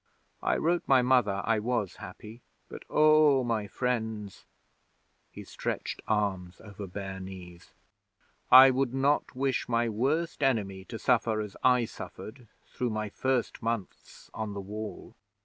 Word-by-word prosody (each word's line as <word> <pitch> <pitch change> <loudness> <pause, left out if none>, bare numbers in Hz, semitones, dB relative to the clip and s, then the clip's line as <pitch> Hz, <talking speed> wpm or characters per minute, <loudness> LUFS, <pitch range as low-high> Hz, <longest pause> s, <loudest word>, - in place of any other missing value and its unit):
I - - +1
wrote 170 +2 +1
my 130 -2 +5
Mother 120 -6 +2
I 115 -1 +2
was 115 -3 -2
happy, 105 +4 -11 0.3
but, - - -9
oh, 155 -3 +5
my 115 -4 -1
friends' 110 -4 -3 0.8
he - - -10
stretched - - -4
arms 95 -4 -1
over 100 -1 -9
bare 95 0 -6
knees 90 -2 -10 0.8
'I 130 +1 +10
would 130 -1 -1
not 140 +1 +1
wish 130 -1 -1
my 120 0 +1
worst 145 +10 -1
enemy 100 -8 0
to 115 - -7
suffer 115 -1 +1
as 105 -2 -5
I 125 -2 +4
suffered 115 +2 -10 0.2
through 125 - -3
my 110 -1 -3
first 130 +3 -1
months 115 -4 -5
on 110 -2 -5
the - - -4
Wall. 105 +2 -7
115 Hz, 140 wpm, -29 LUFS, 100-130 Hz, 0.8 s, I